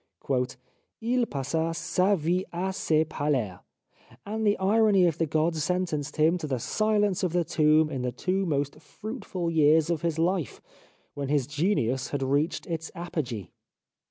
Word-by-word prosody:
" 125 0 -42
II 240 +1 +1
passa 160 +4 -2
sa 180 +4 +2
vie 175 +2 0
a 185 +2 -2
se 155 -4 +2
parler," 140 - -1 0.7
and 220 +1 -1
the 205 - +3
irony 200 -1 +4
of 165 -2 0
the 165 - +1
gods 155 +1 +1
sentenced 160 -4 -1
him 160 +3 +3
to 155 - -4
the 135 -3 -1
silence 205 - +1
of 180 -3 -1
the 175 -1 +2
tomb 155 0 +3
in 135 -3 -3
the 125 0 -1
two 185 +9 -1
most 145 -1 -1
fruitful 190 - -5
years 160 +1 +4
of 165 -3 -1
his 165 -2 -1
life, 170 -1 0 0.5
when 140 -1 -4
his 145 -3 +2
genius 140 - 0
had 145 -2 -2
reached 140 +4 0
its 165 -2 -4
apogee 150 - -4
160 Hz, 160 wpm, -27 LUFS, 145-185 Hz, 0.7 s, irony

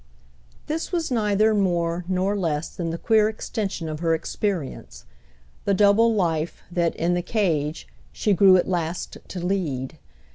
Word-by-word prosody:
This 320 +2 -3
was 335 -5 -1
neither 215 -2 +2
more 175 -3 0
nor 190 +2 0
less 165 -5 -1
than 170 -2 -3
the 165 - -3
queer 215 +2 +3
extension 205 -5 -4
of 155 -1 -4
her 165 -1 +2
experience, 175 -2 -4 0.6
the 200 - +2
double 210 +3 +4
life 165 -4 -1
that, 170 -2 0
in 170 +2 0
the 175 - 0
cage, 165 - -1 0.2
she 205 - +1
grew 190 0 +6
at 180 - 0
last 175 -1 -3
to 185 - -6
lead. 160 -7 -2
180 Hz, 150 wpm, -24 LUFS, 165-205 Hz, 0.6 s, grew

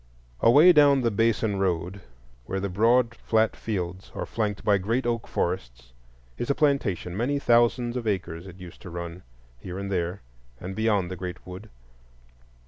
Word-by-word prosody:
Away 150 +10 +7
down 145 -3 +5
the 115 -2 +1
Baysan 110 -1 +1
road, 95 +1 -1 0.5
where 95 - -2
the 100 +1 -3
broad 115 +5 +3
flat 110 -1 +1
fields 95 -3 -5
are - - -3
flanked 105 -2 -3
by 100 -2 +4
great 115 +7 -1
oak 115 -2 -1
forests, - - -3 0.5
is 120 - -3
a 140 - +2
plantation; 120 - 0
many 125 +7 0
thousands 120 -1 +2
of 120 -3 -3
acres 90 -3 -3
it 95 -1 -11
used 90 -2 -12
to - - -9
run, 85 +1 -7 0.4
here 90 +7 -7
and 100 0 -5
there, 90 0 -2 0.4
and 95 +2 -6
beyond 105 -5 +1
the - - -4
great 90 0 -7
wood. 90 +4 -9
100 Hz, 165 wpm, -26 LUFS, 90-115 Hz, 0.5 s, Away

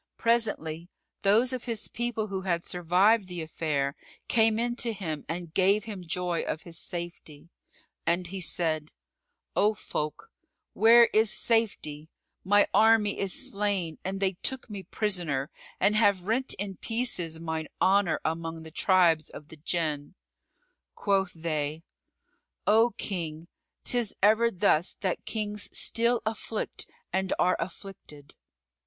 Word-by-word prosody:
Presently, 205 -8 0 0.3
those 225 +6 +3
of 255 - -4
his 230 -3 -3
people 235 -2 -2
who 190 -1 -3
had 175 -3 -1
survived 185 +5 +3
the 175 -2 -4
affair 150 -3 -1 0.3
came 225 -2 +4
in 240 +1 0
to 235 -3 0
him 160 -7 -4
and 170 -1 -4
gave 195 +2 +4
him 205 -5 -7
joy 175 0 -1
of 155 - -4
his 170 -1 -7
safety; 170 -2 -7 0.5
and 175 +2 +1
he 190 +2 -5
said, 160 -3 -1 0.6
"O 210 +2 +3
folk, 155 - -4 0.4
where 235 +2 +7
is 220 0 +4
safety? 195 -10 0 0.3
My 205 +2 +4
army 220 -2 +4
is 195 -2 -1
slain 195 -6 -1
and 195 +1 -3
they 195 -1 +2
took 265 -4 -2
me 200 -2 -5
prisoner 175 -8 -2 0.3
and 210 - +4
have 200 -4 +3
rent 245 +5 0
in 195 -2 -5
pieces 205 -9 -2
mine 160 -1 -3
honour 195 -2 +3
among 165 0 -3
the 160 - -10
tribes 170 -3 +3
of 150 - -11
the 160 - -11
Jann." 155 -1 -2 0.8
Quoth 195 -2 +1
they, 155 -1 -3 0.8
"O 225 +3 +4
King, 165 -4 -3 0.4
'tis 240 -4 0
ever 220 +3 +5
thus 175 -4 +2
that 185 -3 -2
kings 210 -2 -2
still 235 +1 +2
afflict 220 0 -3 0.3
and 190 0 0
are 180 - +3
afflicted." 165 -5 -8
190 Hz, 135 wpm, -28 LUFS, 165-215 Hz, 0.8 s, where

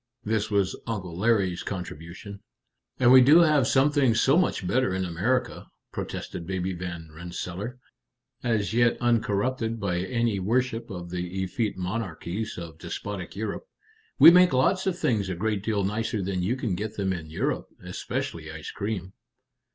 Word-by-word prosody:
this 110 0 0
was 100 -3 +1
Uncle 95 -7 -4
Larry's 95 -3 +1
contribution. 90 +2 -7 0.6
"And 125 -1 +6
we 130 0 +10
do 150 +7 +7
have 150 -7 +4
some 140 +2 +4
things 130 -6 +3
so 135 +5 +4
much 175 - +1
better 120 -1 +1
in 95 0 -1
America!" 120 +9 -1 0.2
protested 85 - -5
Baby 95 0 -2
Van 85 -3 -6
Rensselaer, 90 +7 -6 0.6
as 110 -4 0
yet 120 0 +3
uncorrupted 115 0 0
by 90 -4 -1
any 115 +1 0
worship 115 +4 0
of 90 -3 -7
the 90 +1 -3
effete 105 +3 -2
monarchies 95 +1 -4
of 85 -2 -8
despotic 100 -4 -6
Europe. 110 - -4 0.5
"We - - +11
make 180 -3 +6
lots 185 +10 +2
of 180 -2 0
things 105 - 0
a 90 - -2
great 105 +2 -1
deal 105 -2 0
nicer 105 +1 -1
than 95 -1 -2
you 100 +8 0
can 120 -7 -2
get 105 +4 -4
them 95 -2 0
in 80 -3 -6
Europe 80 - -2 0.2
especially 80 -1 -4
ice 80 0 -7
cream." 100 -3 -4
105 Hz, 160 wpm, -26 LUFS, 90-120 Hz, 0.6 s, We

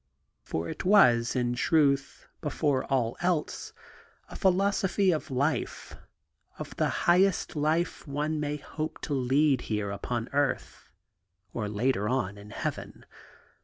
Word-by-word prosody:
For 80 +1 -4
it - - -5
was, 125 - +5
in 120 -1 +1
truth, 140 +1 +1
before 145 -3 0
all 120 -4 0
else, 175 -3 -1 0.6
a - - -9
philosophy 195 0 +2
of 155 - -2
life, 140 +4 -2 0.6
of - - -7
the - - +2 0.2
highest 185 +1 +3
life 155 +3 0
one 150 +2 -2
may 150 0 -2
hope 155 +2 -5
to 150 - -3
lead 135 +1 +2
here 105 -2 -1
upon 115 +3 -3
earth, 145 -1 -1 0.6
or 105 -3 -3
later 105 0 0
on 105 -6 -1
in 105 +1 -12
heaven. - - -5
140 Hz, 130 wpm, -28 LUFS, 120-160 Hz, 0.6 s, was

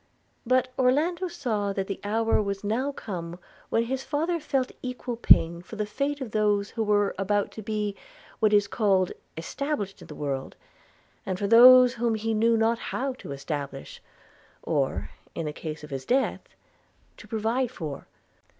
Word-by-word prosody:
But 255 0 +3
Orlando 315 +8 +2
saw 225 - -2
that 195 -1 -2
the 195 - -5
hour 225 +2 +1
was 200 -1 -3
now 240 +7 0
come 175 -9 -6 0.3
when 225 - +2
his 260 +3 -2
father 330 +4 -1
felt 275 -4 -1
equal 250 -1 -4
pain 170 -7 +4
for 185 - -10
the 210 0 -1
fate 280 +7 -2
of 245 -5 -5
those 210 -1 +1
who 230 - -3
were 205 -2 +2
about 205 +1 0
to 220 - -8
be 210 -1 -2 0.4
what 215 -1 +3
is 205 -1 +5
called 195 -4 +2 0.3
established 205 - -3
in - - -11
the - - -9
world, 140 -2 -4 0.7
and 185 -1 -3
for 200 - -2
those 250 +3 +8
whom 235 -1 0
he 225 +1 -1
knew 225 +1 +3
not 225 +1 +2
how 270 +1 -3
to - - -8
establish, 140 -1 -5 0.6
or, - - -1 0.2
in 165 - -3
the 150 - -3
case 155 0 -6
of 150 - -10
his 135 -1 -4
death, 265 +2 +1 0.8
to - - -13
provide 230 +3 0
for. 155 - -7
215 Hz, 170 wpm, -26 LUFS, 195-255 Hz, 0.8 s, those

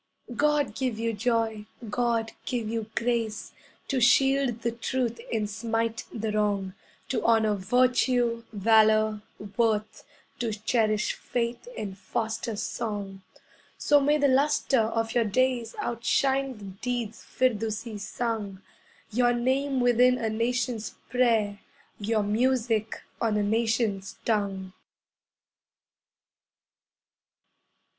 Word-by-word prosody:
God 290 -4 +2
give 255 -2 -2
you 230 0 -1
joy, 220 -1 -1 0.2
God 230 0 0 0.2
give 240 -5 -1
you 225 -1 -3
grace 230 -2 -1 0.4
To 265 -2 0
shield 270 -1 +3
the 235 - +1
truth 235 0 -2
and 215 -2 0
smite 225 +1 -2
the 220 -1 -3
wrong, 205 -3 0 0.4
To 260 - -1
honour 220 -2 +3
Virtue, 245 +2 +2
Valour, 215 0 +4 0.4
Worth. 215 -2 0 0.4
To 230 -3 -1
cherish 215 0 +1
faith 240 - -3
and 195 -2 -4
foster 220 +3 -3
song. 205 -2 -4 0.6
So 290 0 +4
may 295 +2 +3
the 285 -1 +3
lustre 275 -1 +3
of 225 0 0
your 240 - +3
days 240 +1 0
Outshine 265 +2 0
the 210 - -12
deeds 225 +3 -4
Firdusi 225 -2 -1
sung, 210 -2 -3 0.5
Your 240 +2 +3
name 265 +3 +1
within 245 +1 +4
a 225 -3 -1
nation's 230 0 -1 0.2
prayer, 225 -5 +2 0.4
Your 215 +1 0
music 225 0 0 0.2
on 220 -2 +1
a 210 - +1
nation's 220 -2 0
tongue. 195 -4 -1
230 Hz, 110 wpm, -27 LUFS, 215-245 Hz, 0.6 s, Valour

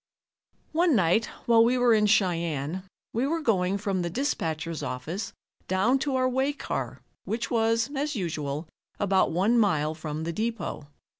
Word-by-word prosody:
One 330 -2 +3
night 190 +3 +3 0.2
while 230 -1 +6
we 245 +2 +3
were 245 -1 +4
in 210 -1 +4
Cheyenne 170 -5 +1 0.3
we 240 +4 +1
were 330 +3 0
going 195 - +1
from 195 -2 -1
the 170 - -2
dispatcher's 165 - -2
office 155 +11 -4 0.4
down 210 +9 +2
to 275 -1 -1
our 255 0 +2
way 265 +3 +1
car, 285 - -4 0.2
which 230 +2 -3
was, 230 0 +2
as 290 +1 -1
usual, 155 -5 -3 0.3
about 195 -2 +3
one 200 +8 +2
mile 155 -8 +2
from 155 -1 -5
the 170 +1 -3
depot. 220 -8 -3
205 Hz, 155 wpm, -27 LUFS, 165-240 Hz, 0.4 s, while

